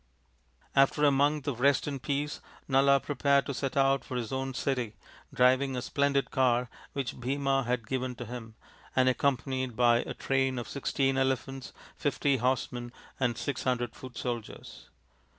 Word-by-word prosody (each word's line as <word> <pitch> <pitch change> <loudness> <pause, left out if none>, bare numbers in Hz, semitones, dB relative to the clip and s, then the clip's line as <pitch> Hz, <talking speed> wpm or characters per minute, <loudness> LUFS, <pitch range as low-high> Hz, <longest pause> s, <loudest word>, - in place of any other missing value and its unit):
After 140 +2 +4
a 145 - +6
month 145 +1 +2
of 130 -4 -2
rest 140 +1 +3
and 140 -3 -4
peace 145 +3 -2 0.3
Nala 140 0 +5
prepared 140 0 +2
to 140 - -3
set 135 +1 -3
out 135 0 +3
for 125 - -5
his 115 -3 -4
own 135 0 -3
city, 125 -5 -1 0.4
driving 130 +2 +3
a 125 - -2
splendid 140 -1 +1
car 125 -2 +2 0.2
which 140 -3 -4
Bhima 135 +1 0
had 120 -2 -1
given 130 0 -2
to 120 - -7
him, 115 -1 -8 0.4
and 130 0 +4
accompanied 130 -1 0
by 120 0 +5
a - - -4
train 135 -1 0
of 120 - -4
sixteen 135 -1 0
elephants, 135 0 -1 0.3
fifty 140 -1 +1
horsemen, 120 -1 -1 0.3
and 120 -3 +1
six 140 -4 -3
hundred 120 -2 0
foot 130 -1 -10
soldiers. 120 -3 -6
130 Hz, 160 wpm, -29 LUFS, 125-140 Hz, 0.4 s, a